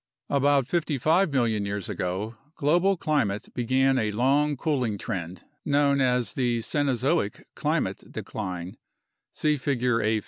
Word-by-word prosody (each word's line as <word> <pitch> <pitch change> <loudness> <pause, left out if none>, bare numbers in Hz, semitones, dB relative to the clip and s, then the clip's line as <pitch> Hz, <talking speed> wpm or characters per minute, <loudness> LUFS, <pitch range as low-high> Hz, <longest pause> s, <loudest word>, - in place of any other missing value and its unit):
About 140 -1 +3
55 160 +3 +1
million 115 -6 +1
years 100 -1 -3
ago 95 +6 -3 0.2
global 175 +7 +2
climate 115 -11 0
began 130 +2 +2
a 110 -1 0
long 140 +6 +2
cooling 125 -7 0
trend 90 -4 -5 0.2
known 140 -1 +2
as 125 -2 +1
the 120 -2 +1
Cenozoic 135 -1 0
climate - - -2
decline 90 -4 -5 0.5
(see 150 -1 +1
Figure 125 -3 0
A. 110 +1 +1
125 Hz, 125 wpm, -26 LUFS, 110-145 Hz, 0.5 s, About